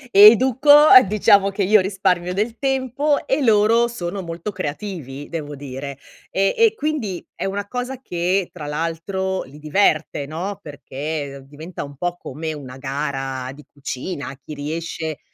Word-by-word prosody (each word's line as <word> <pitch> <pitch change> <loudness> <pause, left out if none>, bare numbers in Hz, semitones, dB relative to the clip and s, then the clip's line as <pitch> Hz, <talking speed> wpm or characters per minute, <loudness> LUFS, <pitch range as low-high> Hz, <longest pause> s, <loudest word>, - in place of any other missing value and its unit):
educo, 245 +7 +7
a 295 -3 +9
diciamo 200 0 +4
che 195 +1 -1
io 210 +2 +5
risparmio 185 -2 0
del 220 +4 -2
tempo 270 +2 0
e 275 +2 +1
loro 225 0 +4
sono 195 -4 -5
molto 170 +3 -5
creativi, 145 -5 -6
devo 150 -3 -5
dire, 140 0 -7 0.3
e 195 +1 +1
e 455 -1 +5
quindi 285 - -3
è - - -5
una 200 +1 -2
cosa 250 +4 -4
che, 180 -2 -1
tra 155 -4 -8
l'altro, 165 +5 -2
li 135 +3 -14
diverte, 155 -2 +1
no, 180 +7 -5
perché 145 -1 -6
diventa 155 +3 -7
un 140 - -12
po' 175 +4 -3
come 160 +2 -5
una 135 -4 -8
gara 135 -1 -4
di 150 +2 -15
cucina. 140 +1 -5
Chi 155 - -8
riesce 160 +1 -4
175 Hz, 150 wpm, -21 LUFS, 145-210 Hz, 0.3 s, a